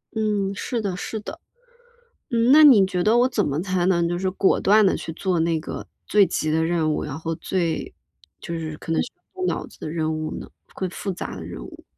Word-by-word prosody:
嗯， 210 Hz, -3 st, 0 dB
是 230 Hz, +3 st, -3 dB
的， 190 Hz, -4 st, -3 dB
是 220 Hz, -, -4 dB
的。 305 Hz, +10 st, -8 dB, 0.9 s
嗯， 235 Hz, 0 st, +3 dB
那 305 Hz, +2 st, +9 dB
你 240 Hz, -10 st, +8 dB
觉 185 Hz, -2 st, -1 dB
得 220 Hz, +2 st, +4 dB
我 250 Hz, +1 st, +4 dB
怎 235 Hz, -6 st, 0 dB
么 145 Hz, +2 st, -1 dB
才 185 Hz, -2 st, 0 dB
能 170 Hz, -2 st, +2 dB
就 175 Hz, 0 st, -1 dB
是 190 Hz, +1 st, -1 dB
果 195 Hz, 0 st, +2 dB
断 210 Hz, +2 st, +5 dB
地 190 Hz, -, +3 dB
去 165 Hz, -, -6 dB
做 180 Hz, +1 st, -1 dB
那 165 Hz, 0 st, +1 dB
个 -, -, -7 dB, 0.2 s
最 205 Hz, -2 st, +5 dB
急 155 Hz, -, -1 dB
的 160 Hz, +1 st, +2 dB
任 165 Hz, -2 st, +1 dB
务， -, -, -2 dB
然 145 Hz, -2 st, -5 dB
后 165 Hz, 0 st, -3 dB
最 170 Hz, -4 st, -2 dB, 0.5 s
就 170 Hz, -1 st, -5 dB
是 155 Hz, -1 st, -5 dB
可 -, -, -8 dB
能 165 Hz, -, +2 dB
是 -, -, -2 dB, 0.3 s
要 -, -, -8 dB
动 -, -, +1 dB
脑 -, -, -1 dB
子 -, -, -17 dB
的 -, -, -6 dB
任 160 Hz, 0 st, -1 dB
务 155 Hz, 0 st, -4 dB
呢， -, -, -9 dB, 0.3 s
会 190 Hz, -, -2 dB
复 195 Hz, +2 st, -4 dB
杂 100 Hz, -, -6 dB
的 85 Hz, -, -7 dB
任 80 Hz, -8 st, -8 dB
务？ -, -, -12 dB
180 Hz, 255 characters per minute, -23 LUFS, 160-210 Hz, 0.9 s, 那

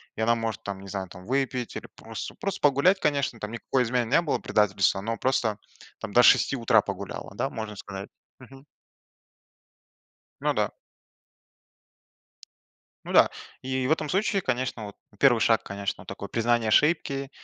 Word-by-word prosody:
И -, -, -4 dB
она 115 Hz, +1 st, +4 dB
может 115 Hz, -2 st, -4 dB
там, 100 Hz, -1 st, -5 dB
не 100 Hz, -, -11 dB
знаю, 95 Hz, 0 st, -4 dB
там 90 Hz, +1 st, -12 dB
выпить 130 Hz, -1 st, -1 dB
или -, -, -6 dB
просто -, -, -7 dB
просто 195 Hz, -1 st, -3 dB
погулять, 145 Hz, +7 st, +4 dB
конечно, 140 Hz, -7 st, 0 dB
там 105 Hz, 0 st, -5 dB
никакой 125 Hz, +2 st, 0 dB
измены 120 Hz, -1 st, 0 dB
не 170 Hz, -, +5 dB
было, 165 Hz, -, -1 dB
предательства, 95 Hz, -2 st, +2 dB
но 115 Hz, +3 st, -3 dB
просто 115 Hz, -5 st, 0 dB, 0.4 s
там 100 Hz, -, -7 dB
до 125 Hz, -, +6 dB
6 135 Hz, -, +5 dB
утра 115 Hz, -2 st, +4 dB
погуляла, 100 Hz, 0 st, -6 dB
да, -, -, -1 dB
можно 110 Hz, -1 st, -6 dB
сказать. 95 Hz, 0 st, -8 dB, 0.3 s
Мгм. 135 Hz, +1 st, -15 dB, 1.8 s
Ну -, -, +1 dB
да. -, -, 0 dB, 2.3 s
Ну -, -, -6 dB
да, -, -, +6 dB, 0.3 s
и 130 Hz, 0 st, -1 dB
в -, -, -1 dB
этом 155 Hz, -1 st, -1 dB
случае, 195 Hz, +3 st, +1 dB
конечно, 125 Hz, -5 st, -2 dB
вот, 100 Hz, -1 st, -9 dB, 0.2 s
1 120 Hz, -3 st, +5 dB
шаг, 115 Hz, 0 st, +3 dB
конечно, 100 Hz, 0 st, -5 dB
такое 100 Hz, +1 st, -7 dB
признание 115 Hz, 0 st, +1 dB
ошибки, 140 Hz, +1 st, +2 dB
120 Hz, 160 wpm, -26 LUFS, 105-135 Hz, 2.3 s, до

